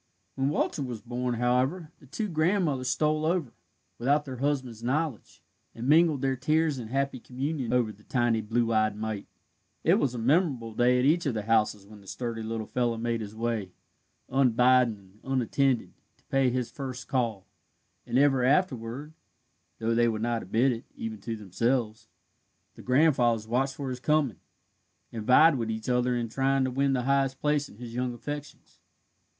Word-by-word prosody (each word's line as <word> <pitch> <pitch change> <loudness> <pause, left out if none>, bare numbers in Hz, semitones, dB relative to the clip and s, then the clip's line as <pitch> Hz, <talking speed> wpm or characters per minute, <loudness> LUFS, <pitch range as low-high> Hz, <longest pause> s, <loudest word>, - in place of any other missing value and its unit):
When 135 +1 0
Walter 150 0 -1
was 125 -5 -5
born, 125 +1 -2
however, 130 +8 0
the 140 - -18
two 160 - -3
grandmothers 160 -6 +1
stole 155 +2 +1
over, 165 -6 0 0.5
without 145 +5 +2
their 130 -2 -6
husbands' 130 -4 -2
knowledge, 135 0 -3 0.3
and 115 +2 -5
mingled 155 -2 +4
their 135 -1 +1
tears 155 +2 +1
in 115 - -6
happy 135 +1 -1
communion 130 0 -3
over 120 -3 +2
the 105 0 -17
tiny 120 -1 +1
blue 115 +2 0
eyed 110 -1 +2
mite. 110 -1 -4 0.6
It - - +4
was 130 -3 0
a - - -4
memorable 130 -2 +1
day 125 +3 +3
at 125 - +2
each 165 +2 +3
of 125 - -1
the 105 - -2
houses 105 -2 +1
when 105 0 -14
the 100 - -18
sturdy 115 +1 -4
little 110 0 -4
fellow 120 0 -1
made 115 0 -1
his 105 0 -7
way, 110 -5 -2 0.5
unbidden 125 -2 +3
and 100 +1 -21
unattended, 130 0 +1 0.2
to - - -33
pay 135 -1 +3
his 125 -1 -2
first 130 -3 -6
call, 115 -7 -1 0.6
and 125 - 0
ever 135 -2 +4
afterward 135 -1 0 0.6
(though 115 0 0
they 120 0 +3
would 110 -1 -1
not 120 -1 0
admit 115 +8 +2
it, 115 -1 -5
even 110 -2 -6
to 115 +2 -4
themselves) 110 +3 -1 0.7
the - - -13
grandfathers 125 -5 +3
watched 130 +3 0
for 140 -2 -4
his 125 - -5
coming, 145 - +1 0.7
and 110 -2 -6
vied 150 +4 +6
with 115 -1 -2
each 110 +1 -4
other 125 0 +2
in 120 -1 -1
trying 135 +4 +1
to 130 - -1
win 135 +1 +1
the 125 -2 0
highest 135 0 +1
place 150 -1 0
in - - -16
his 120 -1 -8
young 125 0 -2
affections. 145 +3 -8
125 Hz, 180 wpm, -28 LUFS, 115-140 Hz, 0.7 s, vied